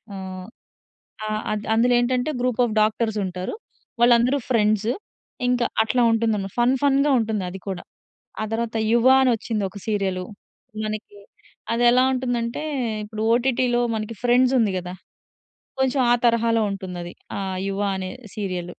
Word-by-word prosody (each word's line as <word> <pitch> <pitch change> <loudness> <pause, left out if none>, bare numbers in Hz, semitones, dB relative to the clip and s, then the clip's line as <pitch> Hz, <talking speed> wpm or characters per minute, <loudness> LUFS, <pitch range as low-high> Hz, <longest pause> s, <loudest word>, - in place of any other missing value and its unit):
ఆహ్, 185 -1 -7 0.8
ఆ! - - -3 0.2
అద్ 210 -1 -4
అందులో 245 +2 +3
ఏంటంటే 250 +4 0
గ్రూప్ 250 -2 -1
ఆఫ్ 220 - -3
డాక్టర్స్ 215 0 +1
ఉంటారు. 185 - -4 0.5
వాళ్ళందరూ 240 +3 +4
ఫ్రెండ్స్. 215 -2 +2 0.6
ఇంకా 245 -1 +2 0.2
అట్లా 230 +3 +1
ఉంటుందన్నమాట. 215 -4 0
ఫన్ 250 +2 +3
ఫన్‌గా 280 +1 +3
ఉంటుంది 220 -3 -1
అది 190 +1 -8
కూడా. 185 -2 -4 0.6
ఆ - - 0
తరువాత 230 0 -2
'యువ' 235 +2 +5
అని 255 -2 +4
వచ్చింది 220 -1 -3
ఒక 205 - -10
సీరియలు. 190 -3 -1 0.6
మనకి 215 -1 -5 0.6
అది 235 - +1
ఎలా 250 +1 +4
ఉంటుందంటే 245 -1 -2 0.4
ఇప్పుడు 215 +1 -6
ఓటిటి‌లో 245 0 +2
మనకి 215 +1 -4
ఫ్రెండ్స్ 250 +1 +4
ఉంది 215 -3 +2
గదా! 180 0 -5 0.9
కొంచెం 265 +1 +1
ఆ - - +7
తరహాలో 230 -1 +3
ఉంటుందది. 180 -3 -6 0.2
ఆ - - -3 0.3
'యువ' 200 +1 -1
అనే 185 -1 -4 0.2
సీరియలు. 185 -4 -3
225 Hz, 140 wpm, -23 LUFS, 200-245 Hz, 0.9 s, ఆ